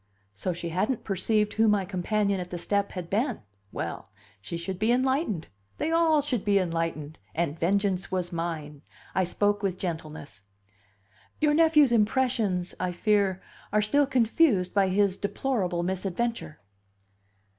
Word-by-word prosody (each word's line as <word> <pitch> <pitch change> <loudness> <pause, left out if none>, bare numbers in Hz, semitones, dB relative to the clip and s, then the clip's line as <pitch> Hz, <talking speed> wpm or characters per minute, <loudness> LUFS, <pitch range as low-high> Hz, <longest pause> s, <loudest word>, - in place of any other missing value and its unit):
So 105 - -3
she 170 0 -4
hadn't 210 +9 -1
perceived 210 +2 0
who 225 0 +3
my 205 -2 +2
companion 200 +2 0
at 180 -1 -5
the 180 - -4
step 200 +3 -1
had 180 -3 -5
been! 230 +7 -1 0.3
Well, - - -5 0.3
she 170 - -5
should 180 +2 -5
be 220 +3 +2
enlightened, 255 - 0 0.3
they 320 - -1
all 325 -3 +3
should 250 -7 -2
be 205 -1 +3
enlightened, 165 -4 -2 0.2
and 165 -1 -1
vengeance 195 +1 0
was 180 -2 -1
mine. 155 -4 -4 0.3
I 190 - +2
spoke 205 +3 0
with 190 -3 -1
gentleness: 155 - -6 1.0
"Your 300 -1 +3
nephew's 305 -4 +5
impressions, 220 -5 +1
I 185 -1 -1
fear, 200 0 +1 0.3
are 210 0 +2
still 285 +7 +3
confused 230 - +2
by 200 -2 +3
his 195 0 +1
deplorable 200 -6 -1
misadventure." 190 - -3
195 Hz, 145 wpm, -27 LUFS, 175-225 Hz, 1.0 s, nephew's